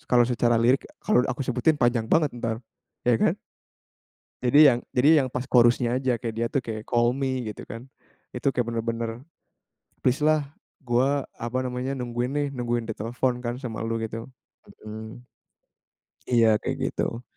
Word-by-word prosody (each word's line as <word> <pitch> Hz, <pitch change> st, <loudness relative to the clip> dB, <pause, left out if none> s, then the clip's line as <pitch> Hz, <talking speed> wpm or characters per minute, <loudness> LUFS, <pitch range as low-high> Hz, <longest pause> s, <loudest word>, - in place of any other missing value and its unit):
s -, -, -28 dB
kalau 120 Hz, -1 st, +5 dB
secara 120 Hz, -1 st, +2 dB
lirik 120 Hz, +4 st, +2 dB, 0.2 s
kalau 210 Hz, -, +4 dB
aku 130 Hz, +1 st, -2 dB
sebutin 130 Hz, +5 st, +1 dB
panjang 120 Hz, -3 st, +1 dB
banget 155 Hz, -3 st, +3 dB
entar, 115 Hz, -2 st, -3 dB, 0.5 s
ya 120 Hz, -1 st, +4 dB
kan. -, -, +3 dB, 1.1 s
Jadi 125 Hz, +4 st, +4 dB
yang 120 Hz, -, -1 dB, 0.2 s
jadi 130 Hz, +4 st, +5 dB, 0.2 s
yang -, -, -3 dB
pas 125 Hz, +1 st, -4 dB
chorus-nya 120 Hz, 0 st, +3 dB
aja, 130 Hz, -2 st, +1 dB
kayak 115 Hz, 0 st, -5 dB
dia 115 Hz, +1 st, 0 dB
tuh 140 Hz, -, -1 dB
kayak, 110 Hz, -1 st, -6 dB
call 120 Hz, 0 st, +3 dB
me, 130 Hz, -2 st, -2 dB
gitu -, -, -10 dB
kan. 115 Hz, +3 st, -8 dB, 0.5 s
Itu 125 Hz, +2 st, -1 dB
kayak 120 Hz, -3 st, -1 dB
benar-benar, 115 Hz, 0 st, -3 dB, 0.8 s
"Please 130 Hz, +4 st, +1 dB
lah, 155 Hz, -1 st, +4 dB, 0.4 s
gua," 135 Hz, +3 st, +1 dB, 0.2 s
apa 120 Hz, +2 st, -2 dB
namanya, 125 Hz, +1 st, -3 dB
"nungguin 125 Hz, 0 st, -3 dB
nih, 145 Hz, 0 st, 0 dB
nungguin 120 Hz, -3 st, -2 dB
ditelepon 120 Hz, +3 st, -2 dB
kan 120 Hz, +3 st, -3 dB
sama 115 Hz, -3 st, -4 dB
lu," 115 Hz, 0 st, -2 dB
gitu. 115 Hz, 0 st, -5 dB, 0.6 s
Mhm. 110 Hz, +3 st, -8 dB, 1.1 s
Iya 115 Hz, -3 st, +4 dB
kayak -, -, -2 dB, 0.2 s
gitu. 115 Hz, +1 st, -2 dB
120 Hz, 160 wpm, -25 LUFS, 115-130 Hz, 1.1 s, kalau